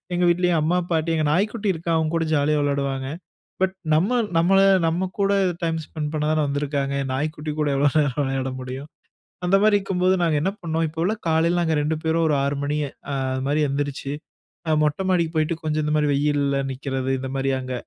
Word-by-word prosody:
எங்க 180 - +1
வீட்லயும் 175 -1 +2
அம்மா, 170 +4 +1
பாட்டி, 165 0 +1
எங்க 155 - +1
நாய்க்குட்டி 210 +5 0
இருக்கான். 165 0 -1
அவன்கூட 165 +1 0
ஜாலியா 150 +1 +2
விளையாடுவாங்க; 140 -2 -1 0.6
பட் 190 0 +1 0.2
நம்ம, 175 +8 +2 0.3
நம்மள, 190 +4 +4 0.3
நம்ம 180 +3 -1
கூட 200 0 +3 0.3
டைம் 165 0 0
ஸ்பெண்ட் 150 -1 -5
பண்ணா 150 0 0
தான 155 -1 +2
வந்திருக்காங்க, 140 -1 -1 0.2
நாய்க்குட்டி 150 +2 -3
கூட 150 - +1
எவ்ளோ 140 +1 +3
நேரம் 145 -1 0
விளையாட 135 0 -2
முடியும்? 130 +3 -7 0.6
அந்த 185 +2 +4
மாரி 215 -1 +5
இருக்கும்போது 185 -1 +1
நாங்க 160 -2 +2
என்ன 190 - +1
பண்ணோம், 165 0 -1
இப்போவெல்லாம் 170 +8 -2
காலைல 165 +2 +2
நாங்க 160 -1 +1
2 155 +2 0
பேரும் 165 +1 +1
1 150 - +2
6 140 0 -1
மணி 145 +1 -1 0.4
அது 130 -1 -1
மாரி 145 +2 +1
எந்திரிச்சு, 140 0 -3 0.6
அ - - +3
மொட்ட 150 +5 0
மாடிக்கு 170 -3 +2
போய்ட்டு, 155 +1 +1
கொஞ்சம் 155 0 0
இந்த 150 - -1
மாரி 150 -1 +2
வெயில்ல 140 -1 +1
நிக்கிறது, 135 0 -3
இந்த 130 0 -5
மாரி 135 0 0
அங்க 130 0 -5
155 Hz, 185 wpm, -23 LUFS, 140-170 Hz, 0.6 s, மாரி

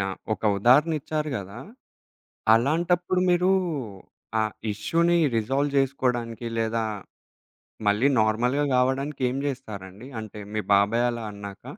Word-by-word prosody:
Yeah! 95 -1 -2 0.2
ఒక - - -18 0.2
ఉదాహరణ 135 - +5
ఇచ్చారు 150 +1 -3
గదా! 100 +2 -7 1.0
అలాంటప్పుడు 175 +8 +1
మీరు 180 +1 +3 0.9
ఆ - - +3 0.3
ఇష్యూని 165 - +1 0.2
రిజాల్వ్ 135 +6 0
జేసుకోడానికి 125 -4 0
లేదా 115 0 0 1.0
మళ్ళీ 105 +6 +3
నార్మల్‌గా 120 +6 +1
గావడానికి 130 +3 0
ఏం 130 - -3
జేస్తారండి? 110 -4 -7
అంటే 105 -1 -9
మీ 110 - -1
బాబాయి 105 +4 +3
అలా 120 -1 -5
అన్నాక? 100 -1 -9
120 Hz, 110 wpm, -25 LUFS, 110-145 Hz, 1.0 s, ఉదాహరణ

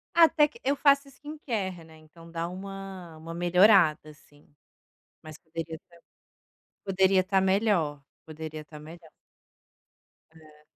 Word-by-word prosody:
Até 320 -3 +6
que 300 - -16
eu 280 +2 0
faço 280 0 +3
skincare, 230 - -5
né, 160 0 -17
então, 165 +2 -17
dá 165 0 -3
uma 190 -2 -9
uma 165 +1 -9
melhorada, 175 -3 +4
assim. 150 -1 -21 0.8
Mas 155 -1 -11
poderia 165 0 -7
estar 170 +2 -22 0.9
poderia 190 0 +3
estar 190 0 +1
melhor, 190 -7 +1 0.2
poderia 155 0 -8
estar 150 0 -13
melhor. 160 +2 -13 1.3
É. 155 -1 -19
175 Hz, 125 wpm, -27 LUFS, 155-195 Hz, 1.3 s, Até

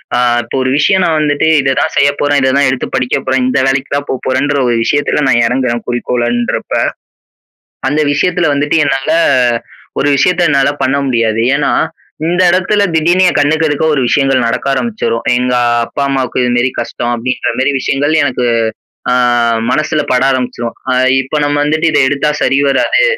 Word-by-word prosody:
அ - - +1 0.3
இப்ப 115 - -7
ஒரு 130 - -1
விஷயம் 190 +6 +2
நா - - +1
வந்துட்டு 150 0 0
இத 135 -1 +1
தான் 160 - -1
செய்ய 140 0 +4
போறேன், 145 0 +1
இத 130 - +2
தான் 140 -1 +3
எடுத்து 130 -1 -2
படிக்க 130 -1 0
போறேன், 130 0 0
இந்த 130 - +1
வேலைக்கு 135 +1 -1
தான் 145 0 -2
போ - - 0
போறேன்ற 135 +3 0
ஒரு 120 - +1
விஷயத்துல 145 +3 0
நா - - +3
இறங்குறேன் 125 -1 -1
குறிக்கோளன்றப்ப, 120 0 -2 1.2
அந்த 150 +2 0
விஷயத்துல 175 +3 0
வந்துட்டு 145 +2 0
என்னால 135 -1 -1 0.9
ஒரு 145 - +1
விஷயத்த 180 +5 +1
என்னால 140 -1 +2
பண்ண 130 +2 +1
முடியாது. 115 -3 0
ஏன்னா, 145 0 0 0.5
இந்த 175 +2 +1
இடத்துல 185 +3 +1
திடீர்ன்னு 175 +4 +2
என் - - 0
கண்ணுக்கு 155 +2 +1
எதுக்க 145 +1 -1
ஒரு 140 - 0
விஷயங்கள் 135 -2 +1
நடக்க 120 +3 -2
ஆரம்பிச்சிரும். 210 - -2 0.2
"எங்க 125 0 -1 0.3
அப்பா, 140 - -4
அம்மாவுக்கு 130 -2 -1
இதுமாரி 120 0 +1
கஷ்டம்." 120 0 -3
அப்படீன்றமாரி 130 +2 -1
விஷயங்கள் 140 +3 -1
எனக்கு 125 -2 -2 0.7
அ - - +3 0.6
மனசுல 155 +1 0
பட 125 0 +2
ஆரம்பிச்சிரும். 125 -2 -3 0.2
"அ - - +2 0.3
இப்ப 135 +3 -6
நம்ம 145 0 0
வந்துட்டு 155 +2 0
இத 145 - +2
எடுத்தா 145 +2 0
சரி 135 +1 +2
வராது, 135 - +2
135 Hz, 170 wpm, -13 LUFS, 125-145 Hz, 1.2 s, செய்ய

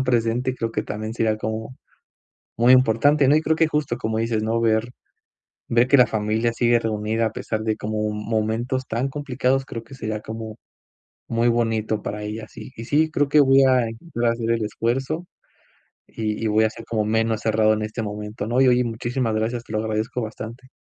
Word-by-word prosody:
tan 130 - 0
presente, 120 +1 +1
creo 115 -2 -3
que - - -1
también 110 +1 -5
sería 110 -2 0
como 110 +3 -5 0.8
muy 120 +2 +6
importante, 130 +4 +4
¿no? 145 - +5
Y 155 - +3
creo 160 0 +1
que, 165 -1 +3
justo, 150 -6 -1
como 110 -2 -2
dices, 115 -1 0
¿no? 115 +1 0
Ver 110 0 +1 0.8
ver 120 +1 +3
que 140 - +6
la 125 - +6
familia 110 +2 0
sigue 120 0 +3
reunida, 110 +1 -1
a 110 - -2
pesar 110 -1 -3
de, 110 -1 0
como 105 0 -2
momentos 110 +4 -2
tan 120 +5 -1
complicados. 135 -1 -1
Creo 115 -4 -7
que 135 - -13
sería, 110 -3 -4
como 110 0 -7 0.7
muy 115 +1 +1
bonito 115 -2 0
para 105 0 -4
ellas. 110 +1 -7
Y 130 - -9
y 115 - -7
sí, 155 +3 +3
creo 145 -2 +1
que 150 - +4
voy 135 -1 +6
a 130 -3 +4 0.3
voy 120 +1 +1
a 115 - +4
hacer 115 -1 -3
el 115 -1 +1
esfuerzo, 135 +10 -2 0.8
y 110 0 -4
y - - +1
voy 110 +1 +3
a 110 - +2
ser, 115 +1 -11
como 110 -2 -1
menos 110 0 +1
cerrado, 110 -1 +3
en 110 - -2
este 110 +2 -4
momento, 105 0 -5
¿no? 120 +3 +1
Y 130 - +5
oye, 125 0 +4
muchísimas 120 0 -2
gracias. 115 +2 -1
Te 110 - -13
lo 110 - 0
agradezco 110 +3 -2
bastante. 115 +3 -7
115 Hz, 205 wpm, -23 LUFS, 110-125 Hz, 0.8 s, muy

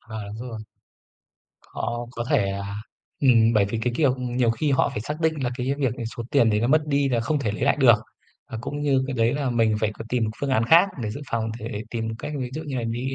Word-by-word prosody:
À, 110 0 -9 0.2
đúng 125 - -6
rồi. 115 -2 -6 1.2
Họ 120 0 -3
có 120 -1 -4
thể, 120 -10 +3
à 100 +1 -4 0.5
ừm, 115 -4 +5
bởi 105 -2 +4
vì, 105 +3 -3
cái 125 - 0
kiểu, 140 -5 +3
nhiều 125 -1 +1
khi 145 +6 0
họ - - +3
phải - - -4
xác 150 +8 -5
định 160 -1 +2
là 120 - 0
cái 130 +3 0
việc 130 -4 0
ấy, 115 - -4
số 120 - -3
tiền 120 -6 +4
đấy 105 0 +1
nó 120 - +1
mất 155 +2 +4
đi 140 -1 +2
là 120 -2 +1
không 150 +6 0
thể 115 -7 -1
lấy 110 - -5
lại 140 - +3
được, 130 -6 +7 0.6
và 115 - -5
cũng 145 +4 -5
như 135 -2 +2
cái 135 - -3
đấy 115 +3 +2
là 140 -3 -1
mình 115 -2 +2
phải 110 -2 +1
có - - -8
tìm 125 -2 +1
một 110 - -2
phương 140 - -1
án 115 -3 +2
khác 170 +10 +6
để 105 - -2
dự 140 - -6
phòng 115 -1 -1
thể 105 -1 -5
tìm 115 -1 -3
được 110 - -4
cách, 150 - -5
ví 125 -2 -3
dụ 155 - -4
như 145 -4 -5
là 120 - -2
đi 120 +4 -2
120 Hz, 275 wpm, -24 LUFS, 115-140 Hz, 1.2 s, được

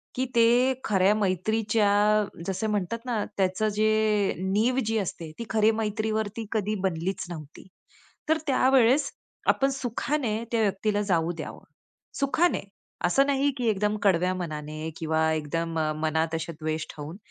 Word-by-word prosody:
की 255 - 0
ते 240 +3 +5
खऱ्या 195 0 +3
मैत्रीच्या, 210 +1 +2 0.2
जसं 195 +3 -1
म्हणतात 205 +2 -1
ना, 230 -4 -1
त्याच 190 +1 0
जे 215 -1 +2
नीव 210 +7 +1
जी 225 +1 0
असते 170 -5 -4
ती 230 - -4
खरी 220 0 +4
मैत्रीवरती 215 0 -2
कधी 215 -1 0
बनलीच 185 +1 -1
नव्हती. 160 0 -9 0.6
तर 320 - +4
त्यावेळेस 265 +1 +4 0.4
आपण 270 - +3
सुखाने 245 -2 -2
त्या 230 -1 +2
व्यक्तीला 205 0 +1
जाऊ 175 -5 +1
द्यावं. 155 - -7 0.6
सुखाने, 310 +5 +2 0.4
असं 270 +10 +4
नाही 280 0 +2
की 245 -2 -1
एकदम 210 0 0
कडव्या 185 -2 +3
मनाने 155 -2 -5
किंवा 160 0 +1
एकदम 165 +2 -2 0.2
मनात 160 +1 0
असे 160 +1 -3
द्वेष 155 0 -3
ठेवून, 155 +3 -7
210 Hz, 135 wpm, -26 LUFS, 170-225 Hz, 0.6 s, ते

